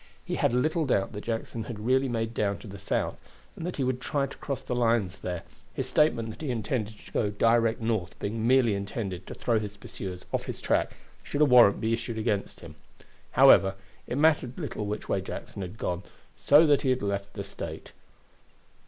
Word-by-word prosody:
He -, -, -4 dB
had -, -, +2 dB
little 155 Hz, +5 st, +1 dB
doubt 100 Hz, -4 st, +1 dB
that 105 Hz, -, -7 dB
Jackson 115 Hz, -1 st, -3 dB
had 120 Hz, -, -6 dB
really 130 Hz, +2 st, +3 dB
made 115 Hz, -1 st, -2 dB
down 100 Hz, -3 st, 0 dB
to -, -, -12 dB
the 100 Hz, 0 st, -9 dB
South, -, -, -1 dB, 0.4 s
and 170 Hz, -, -5 dB
that 180 Hz, -, -4 dB
he 135 Hz, -, 0 dB
would 130 Hz, -1 st, -1 dB
try 135 Hz, +3 st, 0 dB
to 135 Hz, -, -9 dB
cross 140 Hz, -2 st, -4 dB
the -, -, -3 dB
lines 115 Hz, -6 st, +1 dB
there, 90 Hz, -2 st, -4 dB, 0.3 s
his -, -, -2 dB
statement 115 Hz, -7 st, +2 dB
that 110 Hz, -, -11 dB
he 150 Hz, -, -3 dB
intended 110 Hz, -2 st, -2 dB
to -, -, -15 dB
go 105 Hz, -, +1 dB
direct 115 Hz, +2 st, +2 dB
North 110 Hz, -6 st, -1 dB
being 110 Hz, +2 st, -2 dB
merely 125 Hz, -4 st, +4 dB
intended 100 Hz, -2 st, -4 dB
to -, -, -7 dB
throw 115 Hz, -2 st, +1 dB
his 105 Hz, -1 st, -6 dB
pursuers 95 Hz, -3 st, -7 dB
off -, -, -1 dB
his -, -, -5 dB
track -, -, +1 dB, 0.3 s
should 145 Hz, -, -3 dB
a -, -, +8 dB
warrant 125 Hz, -7 st, +7 dB
be 110 Hz, +1 st, 0 dB
issued 115 Hz, 0 st, -3 dB
against 105 Hz, -3 st, -2 dB
him. -, -, -10 dB, 0.6 s
However, 95 Hz, 0 st, +7 dB, 0.3 s
it 125 Hz, -, -2 dB
mattered 145 Hz, -5 st, +3 dB
little 105 Hz, -, -4 dB
which 105 Hz, +1 st, -4 dB
way -, -, 0 dB
Jackson -, -, -7 dB
had 95 Hz, +3 st, -6 dB
gone, 90 Hz, -4 st, -2 dB, 0.3 s
so 150 Hz, +3 st, +6 dB
that 145 Hz, -2 st, +4 dB
he 135 Hz, -, 0 dB
had 130 Hz, -3 st, +1 dB
left 100 Hz, 0 st, -2 dB
the 100 Hz, -, -5 dB
State. 100 Hz, -, -7 dB
115 Hz, 205 wpm, -28 LUFS, 100-125 Hz, 0.6 s, a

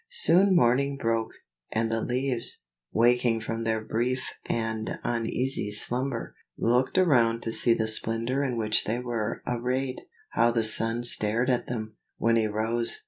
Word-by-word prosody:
Soon 200 Hz, -, +4 dB
morning 140 Hz, +1 st, +2 dB
broke, 115 Hz, -3 st, -1 dB, 0.4 s
and 115 Hz, 0 st, -1 dB
the 115 Hz, 0 st, -1 dB
leaves, 125 Hz, -1 st, -2 dB, 0.3 s
waking 120 Hz, 0 st, +2 dB
from 115 Hz, +1 st, -5 dB
their 110 Hz, -1 st, 0 dB
brief 125 Hz, +4 st, -2 dB, 0.2 s
and 110 Hz, -1 st, -3 dB
uneasy 120 Hz, 0 st, -2 dB
slumber, 120 Hz, +3 st, -2 dB, 0.2 s
looked 125 Hz, +8 st, +1 dB
around 120 Hz, -10 st, +3 dB
to 115 Hz, -, -3 dB
see 115 Hz, +1 st, +3 dB
the 110 Hz, -, -1 dB
splendor 115 Hz, +5 st, +1 dB
in 125 Hz, -4 st, -2 dB
which 110 Hz, -1 st, +1 dB
they 110 Hz, +3 st, -1 dB
were 115 Hz, -3 st, -4 dB
arrayed. 125 Hz, +2 st, -2 dB, 0.3 s
How 120 Hz, -, +3 dB
the 115 Hz, -1 st, 0 dB
sun 115 Hz, +2 st, +4 dB
stared 120 Hz, +2 st, +3 dB
at 120 Hz, -1 st, -1 dB
them, 110 Hz, -3 st, -6 dB, 0.2 s
when 115 Hz, 0 st, +2 dB
he 110 Hz, -1 st, +2 dB
rose. 110 Hz, +2 st, 0 dB
115 Hz, 150 wpm, -26 LUFS, 115-125 Hz, 0.4 s, Soon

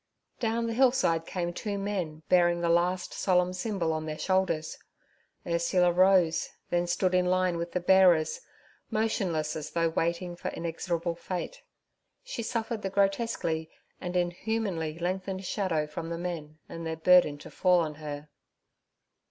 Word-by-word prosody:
Down 230 Hz, -1 st, 0 dB
the 230 Hz, -, -2 dB
hillside 240 Hz, -10 st, +3 dB
came 175 Hz, -2 st, -2 dB
two 205 Hz, +2 st, -3 dB
men 185 Hz, -6 st, -3 dB
bearing 175 Hz, -1 st, +4 dB
the 170 Hz, -, +1 dB
last 175 Hz, +2 st, +1 dB
solemn 180 Hz, -1 st, +2 dB
symbol 185 Hz, -4 st, -1 dB
on 155 Hz, 0 st, -3 dB
their 155 Hz, 0 st, -4 dB
shoulders. 185 Hz, -4 st, 0 dB, 0.7 s
Ursula 175 Hz, +1 st, +2 dB
rose, 180 Hz, -2 st, +4 dB, 0.2 s
then 175 Hz, 0 st, +1 dB
stood 185 Hz, +1 st, +1 dB
in 180 Hz, 0 st, +3 dB
a -, -, +2 dB
line 185 Hz, -1 st, +2 dB
with 170 Hz, 0 st, -4 dB
the 180 Hz, -, +1 dB
bearers, 180 Hz, -3 st, +4 dB, 0.5 s
motionless 195 Hz, -8 st, 0 dB
as 155 Hz, -, -5 dB
though 165 Hz, -1 st, +1 dB
waiting 170 Hz, +2 st, -1 dB
for -, -, -6 dB
inexorable 170 Hz, 0 st, -2 dB
fate. 185 Hz, -, -5 dB, 0.6 s
She -, -, -5 dB
suffered 225 Hz, -1 st, -2 dB
the 195 Hz, -, -2 dB
grotesquely 195 Hz, -5 st, 0 dB, 0.3 s
and 180 Hz, -1 st, -3 dB
inhumanly 175 Hz, -2 st, -1 dB
lengthened 185 Hz, +2 st, -3 dB
shadow 175 Hz, -6 st, 0 dB
from 160 Hz, +2 st, -6 dB
the 170 Hz, -, -3 dB
men 165 Hz, -3 st, -5 dB
and 165 Hz, -, -7 dB
their 160 Hz, 0 st, -3 dB
burden 165 Hz, -3 st, +5 dB
to 145 Hz, -, -12 dB
fall 180 Hz, -2 st, +3 dB
on 155 Hz, -2 st, -2 dB
her. 150 Hz, 0 st, -6 dB
175 Hz, 150 wpm, -29 LUFS, 165-190 Hz, 0.7 s, burden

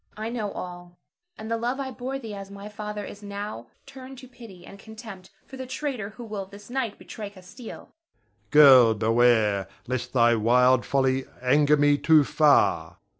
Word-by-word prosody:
I 220 Hz, +1 st, -4 dB
know 220 Hz, -4 st, -4 dB
all; 175 Hz, -1 st, -9 dB, 0.4 s
and 220 Hz, +1 st, -8 dB
the 230 Hz, -, 0 dB
love 245 Hz, +4 st, -3 dB
I 265 Hz, -1 st, -4 dB
bore 260 Hz, +2 st, -5 dB
thee 225 Hz, -5 st, -8 dB
as 195 Hz, -1 st, -8 dB
my 200 Hz, +1 st, -10 dB
father 210 Hz, -1 st, -6 dB
is 205 Hz, -, -11 dB
now 200 Hz, -, -7 dB, 0.2 s
turned 265 Hz, -1 st, -12 dB
to 255 Hz, 0 st, -12 dB
pity 230 Hz, -8 st, -14 dB
and 200 Hz, -, -13 dB
contempt 220 Hz, -4 st, -11 dB, 0.2 s
for 265 Hz, -, -12 dB
the 260 Hz, -1 st, -7 dB
traitor 260 Hz, -6 st, -4 dB
who 245 Hz, -, -8 dB
will 210 Hz, -4 st, -6 dB
this 205 Hz, +3 st, -14 dB
night 250 Hz, -5 st, -3 dB
betray 210 Hz, -2 st, -9 dB
Castile. 200 Hz, +5 st, -12 dB
Ber. 325 Hz, +1 st, -40 dB
Girl, 135 Hz, -6 st, +7 dB
beware, 110 Hz, -3 st, +2 dB, 0.2 s
lest 125 Hz, 0 st, -4 dB
thy 120 Hz, -2 st, +4 dB
wild 125 Hz, +3 st, +3 dB
folly 130 Hz, -1 st, +1 dB
anger 145 Hz, +4 st, +3 dB
me 145 Hz, 0 st, +3 dB
too 155 Hz, -1 st, +5 dB
far! 150 Hz, +1 st, +2 dB
200 Hz, 175 wpm, -25 LUFS, -, 0.4 s, Girl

